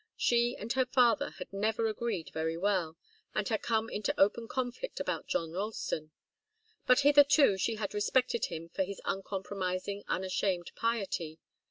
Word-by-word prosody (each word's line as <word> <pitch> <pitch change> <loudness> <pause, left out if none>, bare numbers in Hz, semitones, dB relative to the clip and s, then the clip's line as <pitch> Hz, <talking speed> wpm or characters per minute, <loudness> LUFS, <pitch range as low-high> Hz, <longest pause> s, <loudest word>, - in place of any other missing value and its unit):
She 240 +1 +2
and 225 +3 -3
her 260 0 +2
father 245 -4 +3
had 185 +1 -8
never 220 +3 0
agreed 215 -5 -2
very 160 +1 -1
well, 175 -4 0 0.4
and 215 - 0
had 220 -2 0
come 225 -1 0
into 210 -2 -2
open 225 +4 +3
conflict 255 - -4
about - - -3
John 165 -1 -1
Ralston; 185 -5 -3 0.8
but 250 - +6
hitherto 285 -4 +6
she 225 +4 0
had 210 -2 -4
respected 235 +3 +1
him 165 0 -6
for 190 - -3
his 190 +1 -3
uncompromising, 195 0 -3
unashamed 185 -1 -1
piety. 195 -9 -2
205 Hz, 150 wpm, -31 LUFS, 185-235 Hz, 0.8 s, but